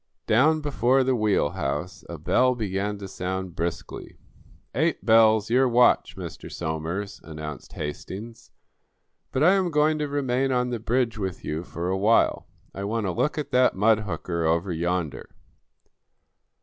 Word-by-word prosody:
Down 155 +8 +3
before 135 -2 +2
the 130 0 +1
wheelhouse 90 - -1
a 85 - -6
bell 125 - +2
began 105 -2 -2
to 100 -1 -7
sound 95 -1 -4
briskly. 85 -2 -5 0.6
"Eight 160 +6 0
bells; 110 -1 +5
your 130 +1 +4
watch, 120 +1 +3
Mr. - - -8
Somers," 85 +5 -4
announced 75 -3 -8
Hastings. 95 +9 -7 0.8
"But 130 - +1
I 180 +4 +6
am 190 -2 +1
going 155 0 +2
to 150 - -1
remain 135 -2 0
on 125 -1 0
the 120 - -2
bridge 115 0 0
with 95 -3 -4
you 75 +2 -2
for 85 0 -5
a 95 - 0
while. 110 +4 +3 0.3
I 100 - -5
want 110 +1 -1
a 95 - 0
look 150 - -1
at 150 - -4
that 125 0 +4
mud 105 +3 +4
hooker 85 -4 -3
over 85 +4 +1
yonder." 85 -2 -3
105 Hz, 150 wpm, -25 LUFS, 90-125 Hz, 0.8 s, I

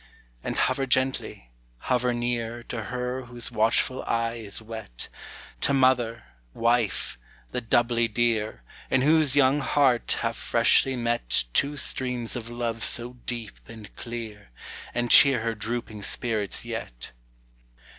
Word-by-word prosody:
And - - -3
hover 135 -1 +1
gently, 130 - 0 0.3
hover 125 - 0
near 120 -1 -2
To 115 -2 -5
her 125 +1 -4
whose 120 -1 -6
watchful 115 +4 +1
eye 115 0 0
is 100 -2 -4
wet, 110 - -8 0.5
To 140 - +3
mother, 120 -4 +2 0.3
wife, 100 - 0 0.3
the 125 - -2
doubly 120 0 +2
dear, 110 - -1 0.3
In 130 -1 +2
whose 150 -2 +4
young 140 0 +4
heart 135 -4 +2
have - - -1
freshly 135 -1 +3
met 120 - 0
Two 145 +1 +1
streams 125 -4 -2
of 120 -1 -6
love 120 -2 -3
so 120 +1 +1
deep 115 -5 -5
and 110 -3 -12
clear, 115 - -7 0.5
And 120 -1 0
cheer 135 -5 +8
her 115 0 -1
drooping 110 0 -4
spirits 105 -1 0
yet. - - -6
120 Hz, 130 wpm, -26 LUFS, 110-125 Hz, 0.5 s, cheer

